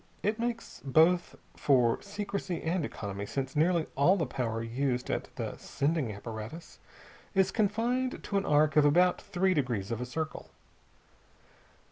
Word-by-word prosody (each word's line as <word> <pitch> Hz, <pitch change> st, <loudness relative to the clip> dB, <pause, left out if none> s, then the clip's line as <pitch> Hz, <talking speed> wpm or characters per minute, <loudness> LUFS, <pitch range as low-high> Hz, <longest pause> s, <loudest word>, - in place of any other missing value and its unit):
It 215 Hz, +2 st, 0 dB
makes 235 Hz, 0 st, -4 dB
both 160 Hz, +6 st, +3 dB, 0.2 s
for 125 Hz, -5 st, +3 dB
secrecy 200 Hz, -3 st, -4 dB
and 170 Hz, +1 st, 0 dB
economy, 100 Hz, -6 st, -5 dB
since 135 Hz, +3 st, -3 dB
nearly 165 Hz, +1 st, +3 dB
all 155 Hz, +8 st, +5 dB
the 165 Hz, -, 0 dB
power 115 Hz, -3 st, -2 dB
used 125 Hz, +2 st, -1 dB
at -, -, -1 dB
the -, -, -4 dB
sending 145 Hz, -4 st, -1 dB
apparatus 110 Hz, +9 st, -8 dB, 0.6 s
is 190 Hz, -1 st, +3 dB
confined 235 Hz, +5 st, 0 dB
to 200 Hz, -, -1 dB
an 195 Hz, -, 0 dB
arc 150 Hz, +1 st, +4 dB
of 150 Hz, -, +6 dB
about 175 Hz, +5 st, +4 dB
three 190 Hz, -1 st, +1 dB
degrees 120 Hz, -, -1 dB
of 115 Hz, +1 st, -2 dB
a 125 Hz, -, -3 dB
circle. 155 Hz, +5 st, -4 dB
155 Hz, 145 wpm, -30 LUFS, 125-190 Hz, 0.6 s, of